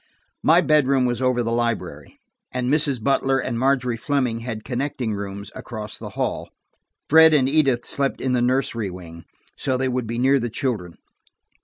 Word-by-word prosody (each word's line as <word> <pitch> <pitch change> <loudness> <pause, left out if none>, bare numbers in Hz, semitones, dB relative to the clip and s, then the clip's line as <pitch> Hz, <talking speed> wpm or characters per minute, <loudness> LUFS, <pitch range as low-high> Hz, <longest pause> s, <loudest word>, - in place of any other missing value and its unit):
My - - +5
bedroom 140 -4 +3
was 120 0 -1
over 130 -2 +1
the 115 - -2
library, 115 -1 -3 0.3
and 125 +1 -1
Mrs. 145 -4 +1
Butler 135 0 +2
and 115 -3 -2
Margery 130 -2 +1
Fleming 125 -2 -1
had 115 -2 -6
connecting 125 -3 -3
rooms, 100 0 -6
across 110 -3 -7
the - - -9
hall. - - -2 0.6
Fred 160 +1 +7
and 130 -3 +3
Edith 135 -4 +2
slept 140 -1 -1
in 130 - -1
the 125 - +2
nursery 120 -4 0
wing, 85 -2 -10 0.3
so 130 -2 -1
they 130 +1 0
would 125 -2 -2
be 115 +1 -3
near 135 +3 +3
the 120 -1 -3
children. 110 - -3
125 Hz, 170 wpm, -22 LUFS, 115-135 Hz, 0.6 s, Fred